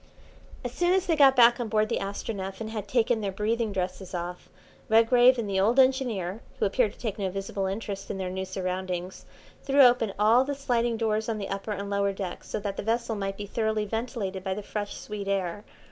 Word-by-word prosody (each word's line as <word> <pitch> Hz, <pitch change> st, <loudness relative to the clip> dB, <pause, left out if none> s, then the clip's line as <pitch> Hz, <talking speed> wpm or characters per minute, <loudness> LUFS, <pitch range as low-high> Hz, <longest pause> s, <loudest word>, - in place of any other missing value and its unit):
As -, -, -2 dB
soon 350 Hz, +1 st, +2 dB
as 380 Hz, -1 st, +1 dB
they 330 Hz, -, +2 dB
got 275 Hz, -3 st, +6 dB
back 240 Hz, 0 st, +6 dB
on 240 Hz, -, -2 dB
board 215 Hz, 0 st, +2 dB
the -, -, -1 dB
Astronef 195 Hz, -1 st, -5 dB
and 220 Hz, -1 st, -5 dB
had 210 Hz, -2 st, -5 dB
taken 235 Hz, -1 st, +2 dB
their 200 Hz, -2 st, -2 dB
breathing 220 Hz, +3 st, -1 dB
dresses 185 Hz, -1 st, -4 dB
off, 175 Hz, +1 st, -5 dB, 0.4 s
Redgrave 240 Hz, +3 st, +6 dB
and 230 Hz, -3 st, -2 dB
the 195 Hz, -1 st, 0 dB
old 220 Hz, +6 st, +3 dB
engineer, 240 Hz, -7 st, +1 dB, 0.2 s
who -, -, +1 dB
appeared 210 Hz, +1 st, +1 dB
to -, -, -20 dB
take 220 Hz, -4 st, -4 dB
no 195 Hz, -2 st, 0 dB
visible 195 Hz, 0 st, -3 dB
interest 195 Hz, 0 st, -5 dB
in -, -, -3 dB
their 185 Hz, -1 st, -3 dB
new 190 Hz, 0 st, -3 dB
surroundings, 185 Hz, -1 st, -4 dB, 0.3 s
threw 280 Hz, +1 st, +4 dB
open 240 Hz, -4 st, +4 dB
all 220 Hz, +5 st, +5 dB
the 285 Hz, +1 st, -3 dB
sliding 240 Hz, -4 st, 0 dB
doors 220 Hz, 0 st, 0 dB
on 220 Hz, -, -1 dB
the 200 Hz, -2 st, -5 dB
upper 195 Hz, +2 st, -4 dB
and 200 Hz, 0 st, -5 dB
lower 200 Hz, 0 st, +1 dB
decks 190 Hz, -2 st, -6 dB
so -, -, -2 dB
that 200 Hz, -1 st, -4 dB
the -, -, -2 dB
vessel 230 Hz, +1 st, 0 dB
might 195 Hz, -1 st, -3 dB
be 205 Hz, -, -5 dB
thoroughly 220 Hz, 0 st, -1 dB
ventilated 210 Hz, -4 st, -3 dB
by 190 Hz, -1 st, -2 dB
the 210 Hz, -, -6 dB
fresh 205 Hz, 0 st, -4 dB
sweet 210 Hz, -2 st, -6 dB
air. 195 Hz, 0 st, -1 dB
210 Hz, 220 wpm, -27 LUFS, 195-235 Hz, 0.4 s, got